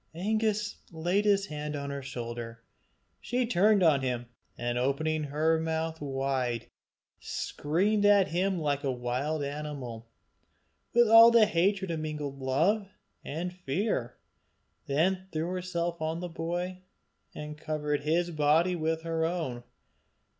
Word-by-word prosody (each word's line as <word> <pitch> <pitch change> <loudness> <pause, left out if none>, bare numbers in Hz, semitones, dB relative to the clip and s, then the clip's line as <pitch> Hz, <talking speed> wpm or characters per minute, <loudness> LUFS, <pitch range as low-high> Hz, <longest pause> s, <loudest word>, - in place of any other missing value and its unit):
Angus 210 +2 0
laid 175 +5 0
his 200 -1 +3
hand 150 -3 -5
on 140 -1 -4
her 140 0 -4
shoulder. 120 -3 -6 0.6
She 245 - -1
turned 205 -1 +4
on 150 -5 +4
him, 125 -2 -2 0.3
and 120 0 -1
opening 155 +4 0
her 155 +3 +1
mouth 160 0 -2
wide, 135 -4 -1 0.5
screamed 195 +8 0
at 205 -2 +5
him 185 +3 0
like 145 -3 -1
a 135 - +1
wild 130 +5 -2
animal, 140 -6 -6 0.8
with 240 0 +5
all 225 +1 +10
the 235 -2 +6
hatred 190 -1 +1
of 165 - -2
mingled 150 -3 -4
love 165 +11 +1 0.4
and 175 +5 -4
fear; 175 - -2 0.7
then 185 +7 +1
threw 160 +2 -2
herself 175 -2 -3
on 160 +1 -1
the 180 0 -5
boy, 175 +3 -3 0.5
and 150 0 -6
covered 150 -1 -2
his 170 +4 +1
body 160 +4 +3
with 160 0 -1
her 165 -1 -1
own. 160 -8 -2
160 Hz, 130 wpm, -29 LUFS, 140-185 Hz, 0.8 s, all